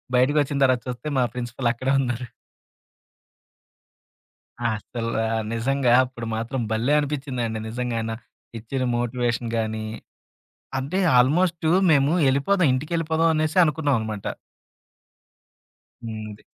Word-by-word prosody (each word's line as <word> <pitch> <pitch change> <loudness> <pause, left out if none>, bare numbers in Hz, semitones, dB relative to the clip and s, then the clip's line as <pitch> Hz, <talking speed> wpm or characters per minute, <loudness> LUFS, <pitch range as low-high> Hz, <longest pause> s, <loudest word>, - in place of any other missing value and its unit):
బయటకొచ్చిన 145 +3 +2
తర్వాత 130 -2 +3
చూస్తే 125 +4 -5
మా 125 - +4
ప్రిన్సిపల్ 120 0 -2
అక్కడే 130 +3 -1
ఉన్నారు. 125 -1 -2 2.4
అసలా 115 0 -2 0.3
నిజంగా 130 +2 +1
అప్పుడు 125 -2 -7
మాత్రం 120 +3 -3
భలే 115 +5 +1
అనిపిచ్చిందండి 135 -6 -2
నిజంగానా. 115 -1 -2 0.4
ఇచ్చిన 125 +4 -4
మోటివేషన్ 120 -1 -1
గానీ, 110 -1 -2 0.9
అంటే 140 +9 -2 0.2
ఆల్‌మోస్టు 160 +5 +2 0.2
మేము 145 0 +4 0.2
ఎళ్ళిపోదాం 155 +6 +2
ఇంటికెళ్ళిపోదాం 160 +3 0
అనేసి 155 +2 0
అనుకున్నాం 150 -2 +1
అనమాట. 110 -2 -5 1.8
హ్మ్. 110 -1 -5
ఉంది. 105 - -12
125 Hz, 100 wpm, -24 LUFS, 115-145 Hz, 2.4 s, మా